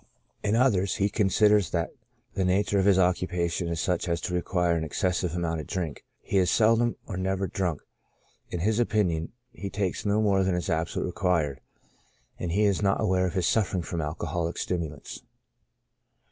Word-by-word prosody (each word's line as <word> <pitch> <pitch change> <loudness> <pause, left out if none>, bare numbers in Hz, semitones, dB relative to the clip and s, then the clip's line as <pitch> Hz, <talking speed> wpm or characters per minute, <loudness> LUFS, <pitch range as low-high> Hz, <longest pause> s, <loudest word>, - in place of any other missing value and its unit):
In 105 +1 +1
others, 105 -7 +2
he 100 -1 +1
considers 105 -2 +3
that 85 -2 -1 0.4
the 95 - 0
nature 100 +2 +2
of 95 - +2
his 100 -2 +5
occupation 90 -1 +1
is 85 -1 -2
such 90 0 -1
as 85 -1 0
to 90 - -3
require 90 -1 +1
an 80 - -1
excessive 90 +1 -1
amount 85 -2 -1
of - - -11
drink; 85 -7 -4 0.2
he 100 - +1
is 90 - +2
seldom 115 +1 +3
or 95 - -5
never 95 +1 -1
drunk; 90 -3 -2 0.7
in 85 - -3
his 110 +4 +1
opinion 90 -9 +1 0.2
he 100 -5 -6
takes 95 -2 -2
no 105 0 +1
more 100 -3 +3
than 95 -1 +1
is 90 - -2
absolutely 80 +2 -1
required, 85 -8 0 0.8
and 90 - -3
he 100 +5 +2
is 100 -2 +2
not 100 -1 +2
aware 95 -4 +2
of 90 - -5
his 90 -2 +1
suffering 95 -4 +1
from 85 0 -3
alcoholic 85 +2 -3
stimulants. 80 -5 -4
90 Hz, 175 wpm, -27 LUFS, 85-100 Hz, 0.8 s, his